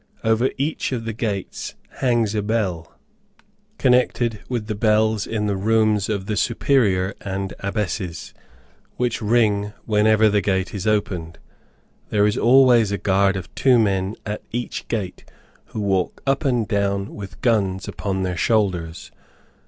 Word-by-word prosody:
Over 115 +3 +2
each 145 +2 -2
of 120 -3 -3
the 115 - -3
gates 105 -4 -4 0.2
hangs 120 -5 +1
a 105 - 0
bell, 100 -6 -2 0.9
connected 125 -3 +2
with 120 -4 -2
the 110 - -3
bells 110 0 +2
in 110 -2 -2
the 100 -1 0
rooms 110 0 +2
of 100 -3 -2
the 105 - -2
Superior 105 -6 +1
and 95 0 -4
Abbesses, 100 -3 -3 0.6
which 120 -2 -1
ring 105 -2 +2
whenever 110 0 +4
the 105 -1 +2
gate 95 -1 -1
is 100 0 -4
opened. 90 -6 -1 0.7
There 105 -1 +3
is 105 - +1
always 120 -4 +5
a 100 - 0
guard 100 0 +2
of 95 -2 -7
two 130 -2 +4
men 100 -2 +1
at 105 0 -4
each 120 +1 -4
gate, 105 -6 -4 0.4
who - - -7
walk 95 -3 -1
up 135 +2 0
and 120 -5 +1
down 100 -2 -1
with 100 -2 -9
guns 95 -6 +1
upon 95 -2 -3
their 90 -1 -2
shoulders. 90 -7 0
105 Hz, 145 wpm, -22 LUFS, 100-115 Hz, 0.9 s, always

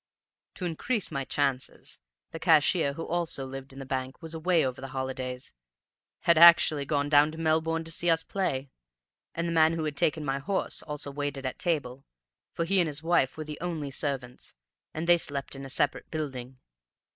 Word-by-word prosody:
"To 185 - -4
increase 195 +6 -2
my 140 -3 -2
chances, 135 -3 -2 0.3
the 165 - -6
cashier, 160 -2 +4
who 165 +3 -6
also 170 -5 -1
lived 135 +1 -8
in 135 - -12
the 135 - -7
bank, 130 0 -4
was 165 -1 -5
away 165 0 +2
over 130 0 -4
the 135 - -5
holidays, 130 -1 -4 0.7
had 170 -2 +4
actually 160 -4 +7
gone 145 -1 +1
down 145 +1 +5
to - - -9
Melbourne 165 0 +1
to 165 - -8
see 170 +1 -1
us 165 0 +3
play; 140 -9 -2 0.6
and 170 +1 -1
the - - -1
man 160 0 +5
who 165 -1 -2
had 150 -2 -2
taken 150 +1 +1
my 135 0 -1
horse 190 +8 -1
also 150 -2 -5
waited 145 -1 -4
at 130 - -4
table; 135 -6 -2 0.5
for 170 - -2
he 195 +3 +2
and 175 - +3
his 150 +1 -2
wife 165 -6 +2
were 155 - -5
the 150 0 -7
only 160 -5 -3
servants, 130 -3 -4 0.4
and 160 +2 -4
they 175 0 +6
slept 140 -3 -3
in 135 0 -7
a - - -8
separate - - 0
building. 130 -5 -5
150 Hz, 190 wpm, -28 LUFS, 135-165 Hz, 0.7 s, actually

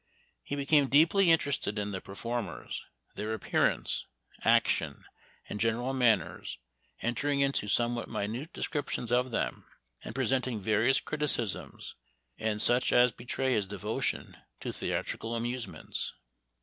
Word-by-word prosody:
He 145 - -4
became 140 0 +4
deeply 165 +7 +5
in 165 - +8
terested 140 -8 -1
in 105 0 -2
the 95 -1 -4
performers, 115 +3 -4 0.3
their 110 +1 -2
appearance, - - 0 0.4
action, - - +2 0.4
and 105 - -5
general 115 +4 +1
manners, 110 -10 +1 0.5
entering 140 +4 0
into 140 -6 +1
somewhat 120 +3 +1
minute 120 - -3
descriptions 145 -8 -2
of 125 +1 +3
them, 115 - -2 0.4
and - - -7
presenting 130 -4 0
various 110 +6 +3
criticisms, 145 -9 -2 0.5
and 110 -1 0
such 120 +4 +4
as 125 0 +6
be 120 - -13
tray 130 +1 0
his 105 -4 +1
devotion 100 +2 -2 0.2
to - - -4
theatrical 115 +1 -2
amusements. 120 +1 -3
120 Hz, 125 wpm, -30 LUFS, 110-135 Hz, 0.5 s, in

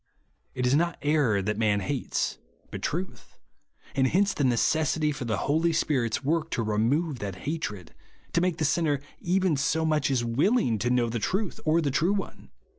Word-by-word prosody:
4). - - -9
It 125 - +1
is 125 - +3
not 170 +3 +1
error 140 -10 +2
tliat 105 +1 -1
man 105 -2 +2
hates, 135 +5 -2 0.3
but - - -6
tnith; 180 +5 -5 0.6
and 130 -1 +2
hence 195 +7 +2
the 145 - -1
necessity 150 +5 +2
for 135 -3 -5
the 110 -3 -1
Holy 160 +4 +2
Spirit's 130 -7 0
work 160 +3 0
to 115 - -1
remove 120 +8 0
that 100 -2 -4
hatred, 115 - -4 0.2
— - - -32
to 170 - +2
make 180 -2 0
the 155 - 0
sinner 145 -2 +1 0.2
even 185 -2 +1
so 160 +4 0
much 155 -3 +1
as 125 -3 +1
willing 125 - +2
to 120 - 0
know 125 -1 +2
the 115 0 -2
truth 190 - -2
or 160 +2 +3
the 145 -3 0
True 165 +8 +2
One. 200 - -5
145 Hz, 190 wpm, -27 LUFS, 120-165 Hz, 0.6 s, is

